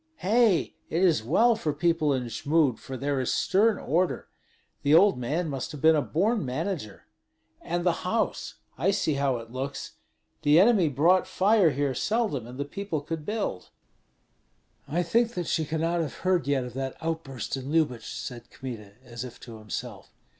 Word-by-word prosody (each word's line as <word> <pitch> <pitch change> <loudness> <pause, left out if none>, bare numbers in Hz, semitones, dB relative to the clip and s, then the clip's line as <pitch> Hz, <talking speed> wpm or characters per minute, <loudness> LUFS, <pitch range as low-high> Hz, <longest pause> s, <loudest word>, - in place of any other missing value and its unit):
"Hei, 215 - +2 0.2
it 170 +4 0
is 170 -10 +4
well 230 - +3
for 155 -8 -2
people 160 -1 +1
in 130 -2 0
Jmud; 140 +2 +1
for 130 - -7
there 140 +1 -1
is 130 - 0
stern 210 +2 +2
order. 175 +6 -1 0.5
The 145 +2 +4
old 180 -6 +5
man 155 +8 -1
must 135 -4 -4
have 150 - -7
been 160 0 +7
a 150 - +2
born 205 +9 0
manager. 130 - -4 0.6
And 175 +1 -2
the 175 - +4
house, 220 +5 -1 0.2
I - - +2
see 175 -5 +1
how 140 -2 +1
it 115 0 -10
looks. 135 +2 -5 0.5
The 150 +3 +5
enemy 195 -5 +5
brought 170 +7 +3
fire 200 -2 +4
here 140 -1 -1
seldom, 205 - -1
and 125 +1 -10
the 140 - -2
people 165 0 -4
could 155 +1 -6
build." 205 - -3 1.2
"I 175 +4 0
think 235 +7 +1
that 175 -1 -2
she 160 0 0
cannot 165 +3 0
have 155 - -4
heard 185 -4 0
yet 140 -2 +1
of 125 -1 -7
that 135 0 -4
outburst 160 -7 -4
in 135 +1 -6
Lyubich," 145 -8 0
said 120 -1 -7
Kmita, 115 -6 -8
as 120 0 -7
if 125 -1 -9
to 115 -2 -10
himself. 110 0 -7
155 Hz, 175 wpm, -27 LUFS, 130-180 Hz, 1.2 s, been